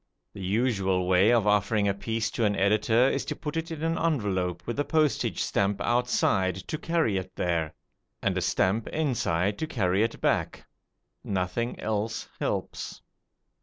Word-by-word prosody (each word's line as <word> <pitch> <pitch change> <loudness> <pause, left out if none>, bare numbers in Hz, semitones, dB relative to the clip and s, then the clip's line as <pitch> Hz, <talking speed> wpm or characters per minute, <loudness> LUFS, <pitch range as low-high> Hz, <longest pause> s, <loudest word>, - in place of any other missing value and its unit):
The 100 - -8
usual 95 -3 +1
way 95 +3 +5
of 115 -4 +3
offering 105 0 +2
a 100 - +2
piece 115 +3 -2
to 115 - -1
an 105 -1 +2
editor 110 +5 +3
is 135 0 0
to - - -3
put 150 -1 -5
it 165 0 -2
in 160 -1 -5
an 165 0 0
envelope 100 - 0
with 120 +4 -3
a - - +3
postage 155 -1 +1
stamp 100 0 0
outside 120 -6 +1
to 155 - -2
carry 165 - +1
it 95 - -6
there, 85 -3 -1 0.4
and - - 0
a - - 0
stamp 105 +4 +1
inside 105 - 0
to 160 - -2
carry 95 -9 +1
it 115 +1 0
back. - - 0 0.6
Nothing 95 +5 -2
else 110 +1 -2
helps. - - -3
105 Hz, 165 wpm, -27 LUFS, 95-125 Hz, 0.6 s, way